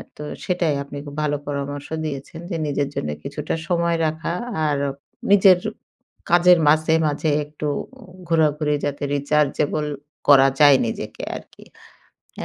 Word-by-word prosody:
তো - - -8 0.2
সেটাই 175 -5 0
আপনি 140 0 -9
খুব 145 0 -9
ভালো 145 -1 0
পরামর্শ 145 0 -4 0.2
দিয়েছেন। 145 +2 -6
যে 175 - -3
নিজের 145 -1 0
জন্য 75 - -2
কিছুটা 145 +1 -4
সময় 170 -1 +1
রাখা। 160 +2 -2 0.3
আর 145 -1 +1 0.5
নিজের 190 -2 +7 0.7
কাজের 175 0 +6
মাঝে, 155 +1 +3
মাঝে 150 +2 -1 0.2
একটু 150 0 -6 0.6
ঘোরাঘুরি 150 -2 +2
যাতে 145 0 -3
rechargeable 150 +1 0 0.4
করা 135 -2 +7
যায় 145 -2 +8
নিজেকে 115 - -5
আরকি। - - -12 0.8
এ - - -3
150 Hz, 130 wpm, -22 LUFS, 145-165 Hz, 0.8 s, যায়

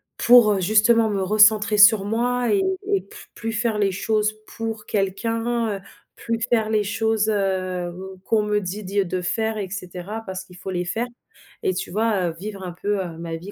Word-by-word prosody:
pour, 240 -3 +6
heu, 195 - -1
justement 220 +3 +4
me 200 -2 -1
recentrer 210 +2 +4
sur 210 -1 +7
moi 245 +3 0
et 395 - +3 0.3
et 400 -1 +1
pl - - -24 0.3
plus 225 0 -4
faire 225 -1 -1
les 200 -2 +2
choses 215 +2 0 0.2
pour 225 -2 -4
quelqu'un, 225 +2 -1
heu, - - -18 0.3
plus 230 0 -3
faire 220 -2 +2
les 215 -1 +2
choses, 220 0 0
hem, 185 -4 -1 0.3
qu'on 215 +1 +1
me 210 0 0
dit 195 +3 -5
dit 200 +2 0
de 185 +1 -2
faire 220 +4 -1
et 200 -3 -4
cetera 185 +2 -6
parce 190 -1 -6
qu'il 180 - -16
faut 190 +1 -7
les 180 -1 -2
faire 225 +7 -2 0.6
et 185 - +1
tu 185 0 -5
vois, 210 -2 +1
heu, 165 - -7
vivre 200 0 -7
un 180 - -5
peu, 200 +3 -2
heu, 170 -3 -8
ma 165 0 -5
vie 180 +5 -9
210 Hz, 200 wpm, -22 LUFS, 190-225 Hz, 0.6 s, sur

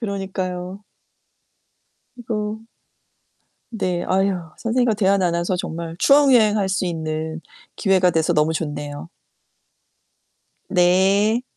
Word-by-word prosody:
그러니까요. 190 -3 -4 1.4
이거 220 -2 -4 1.1
네. 185 -6 -2
아유, 190 0 +1 0.2
선생님과 235 0 +1
대화 200 -1 +2
나눠서 175 -1 0
정말 165 -1 -5
추억여행 255 -7 +5
할 195 -2 0
수 190 0 -1
있는 160 -1 -4 0.3
기회가 190 -3 +3
돼서 160 +1 +1
너무 155 0 +2
좋네요. 145 0 -5 1.6
네. 195 +6 +3
190 Hz, 210 characters per minute, -21 LUFS, 170-210 Hz, 1.6 s, 추억여행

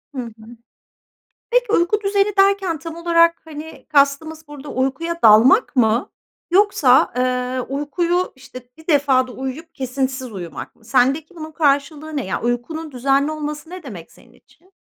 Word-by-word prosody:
Hı 255 - -2
hı. 230 0 -12 0.9
Peki, - - +2
uyku 410 +3 +2
düzeni 400 0 0
derken 390 -5 +2
tam 330 0 -8
olarak, 335 0 +2
hani, 315 +1 -10
kastımız 305 +2 +1
burada 295 0 -10
uykuya 280 +7 -2
dalmak 240 - +6
mı 230 0 +2 0.4
yoksa, 355 -10 +4
eee, 250 0 -1 0.2
uykuyu, 345 +5 -1
işte, 255 -1 -13
bir 320 +1 -17
defada 270 -4 +2
uyuyup 265 +6 -7
kesintisiz 260 -1 -3
uyumak 175 -4 -8
mı? 225 - -25
Sendeki 270 +7 +1
bunun 315 -1 -8
karşılığı 300 0 0
ne? 275 - -2
Yani, 185 - -3
uykunun 300 +7 -3
düzenli 275 +3 +1
olması 300 +1 -6
ne 365 0 -9
demek 190 - -10
senin - - -21
için? 370 +3 -27
290 Hz, 145 wpm, -20 LUFS, 255-335 Hz, 0.9 s, dalmak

